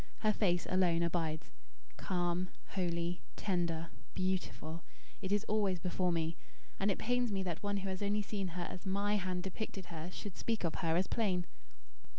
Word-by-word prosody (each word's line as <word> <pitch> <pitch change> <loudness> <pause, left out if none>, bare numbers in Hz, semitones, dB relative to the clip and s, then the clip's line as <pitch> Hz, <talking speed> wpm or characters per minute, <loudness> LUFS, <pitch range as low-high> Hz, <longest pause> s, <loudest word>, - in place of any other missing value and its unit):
Her 215 -1 +5
face 175 -5 +3
alone 175 -2 +4
abides; 165 -2 0 0.5
calm, 180 0 +1 0.2
holy, 175 -1 0
tender, 170 -4 0 0.3
beautiful, 185 -3 -1 0.4
it 190 -1 -2
is 205 0 +4
always 205 -4 +2
before 180 0 +1
me. 165 0 0 0.4
And 195 - +3
it 195 - +2
pains 245 0 +2
me 195 -1 +1
that 175 -3 -2
one 205 0 +1
who 195 0 -2
has 190 0 -3
only 205 +1 +2
seen 200 -2 -1
her 175 - 0
as 180 +1 -5
MY 200 +2 +2
hand 180 -2 -1
depicted 190 0 -4
her 160 +1 -4
should 195 0 -6
speak 225 -4 0
of 165 - +1
her 165 -1 +2
as 185 - +4
plain." 185 -6 +1
185 Hz, 170 wpm, -36 LUFS, 175-200 Hz, 0.5 s, Her